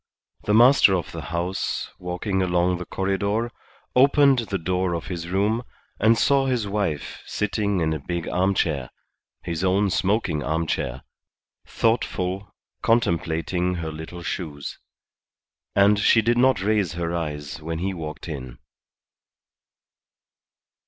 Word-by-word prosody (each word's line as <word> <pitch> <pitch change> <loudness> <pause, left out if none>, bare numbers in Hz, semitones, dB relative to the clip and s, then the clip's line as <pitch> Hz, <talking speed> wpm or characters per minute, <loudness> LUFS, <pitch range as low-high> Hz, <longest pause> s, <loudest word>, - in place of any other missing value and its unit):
The 105 - +3
master 120 -4 +7
of 90 - -3
the - - -6
house, 85 +3 -2
walking 90 +2 -2
along 90 -1 +1
the 90 - -5
corredor, 100 +4 -1 0.4
opened 140 0 +5
the 105 -4 -2
door 90 +1 -1
of 85 - -5
his 85 -1 -5
room, 105 +5 +1 0.4
and 110 +2 +4
saw 135 +1 +3
his 120 -5 0
wife 100 -8 -2
sitting 100 -2 -1
in 80 -1 +1
a 80 - -3
big 85 +4 -4
armchair 90 -8 0 0.5
his 85 0 -3
own 95 +1 +2
smoking 95 -6 +1
armchair 75 -4 -2 0.6
thoughtful, 95 -4 -1 0.3
contemplating 90 -4 +1
her 80 -2 -4
little 80 +3 -8
shoes. 75 -6 -5 1.0
And 100 +1 +5
she 110 +2 +4
did 120 +2 +3
not 130 -7 +3
raise 105 -4 +1
her 85 -1 -3
eyes 75 -2 -4
when 80 +1 -4
he 95 +3 -2
walked 80 -2 -7
in. 65 -6 -6
90 Hz, 125 wpm, -24 LUFS, 85-105 Hz, 1.0 s, master